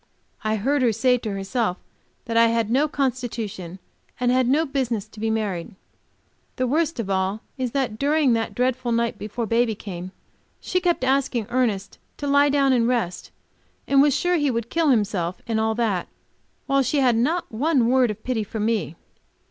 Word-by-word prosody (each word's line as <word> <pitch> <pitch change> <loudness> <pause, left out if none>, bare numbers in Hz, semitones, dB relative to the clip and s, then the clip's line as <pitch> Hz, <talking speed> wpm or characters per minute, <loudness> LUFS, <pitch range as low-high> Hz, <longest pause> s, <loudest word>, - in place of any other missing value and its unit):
I 215 0 +1
heard 270 +7 +1
her 245 -2 +3
say 250 +3 +2
to 220 -2 -4
herself, 195 0 -1 0.5
that 230 - -4
I 230 0 +6
had 230 -1 0
no 280 +5 +3
constitution 235 - -3 0.4
and 245 0 +2
had 255 -1 +2
no 295 +6 +3
business 245 -7 -2
to 215 - -14
get 225 +1 -1
married. 210 -3 -2 0.8
The 255 - 0
worst 315 +3 0
of 225 - -2
all 190 +2 -1
is 260 -3 -2
that 255 -6 -1
during 285 -2 +3
that 225 -1 -1
dreadful 250 0 0
night 235 -1 0
before 215 +3 -4
baby 230 0 +1
came, 185 -3 -7 0.5
she 365 - -1
kept 350 -6 +1
asking 260 -3 +1
Ernest 225 -6 -1 0.2
to 290 - -5
lie 285 +1 +4
down 275 -1 +3
and 235 -2 +2
rest, 230 -8 -1 0.6
and 275 0 +5
was 285 -2 +4
sure 355 +3 +1
he 290 -3 +1
would 230 -2 -3
kill 330 -2 +2
himself, 195 -7 0
and 225 -1 0
all 220 0 +1
that, 215 -6 0 0.6
while 275 0 +2
she 270 +3 0
had 255 -4 +4
not 310 +10 0
one 260 +1 +2
word 255 -1 +3
of 210 - -6
pity 245 -4 -1
for 220 +2 -6
me. 210 -8 -1
235 Hz, 185 wpm, -23 LUFS, 215-270 Hz, 0.8 s, I